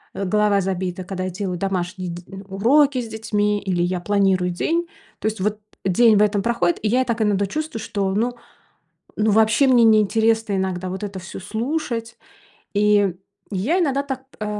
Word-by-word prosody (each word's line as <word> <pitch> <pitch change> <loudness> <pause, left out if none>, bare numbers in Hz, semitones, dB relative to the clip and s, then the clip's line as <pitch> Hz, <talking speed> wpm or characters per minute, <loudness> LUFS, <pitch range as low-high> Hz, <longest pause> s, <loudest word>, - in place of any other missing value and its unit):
э, 195 - -2
голова 205 +1 +2
забита, 185 -1 -3
когда 185 0 -4
я 185 - -2
делаю 185 -1 -4
домашние 185 -1 -2
д 170 +1 -7 0.3
уроки 260 +7 +3
с 230 - -6
детьми 210 -2 -1
или 180 -3 0
я 180 0 -1
планирую 190 -2 +1
день. 335 - -1 0.3
То 215 - -2
есть 215 -2 -2
вот 210 +1 -1 0.3
день 215 +3 +5
в - - +4
этом 205 -1 +1
проходит, 175 -8 +1
и - - +1
я 255 +4 +3
так 235 -2 -2
иногда 200 -2 +2
чувствую, 310 +2 -4
что, 195 -3 -2
ну 240 +4 0 0.8
ну 215 0 +2
вообще 220 +5 +4
мне 245 -2 +5
не 220 -1 +6
интересно 220 0 +1
иногда 185 -1 -2
вот 190 +2 -5
это 195 -2 -6
всё 185 +1 -8
слушать. 230 - -3 0.6
И 205 -3 +3 0.3
я 225 - 0
иногда 280 -4 +1
так, 265 -2 -5 0.2
а, - - -1
210 Hz, 180 wpm, -22 LUFS, 190-230 Hz, 0.8 s, не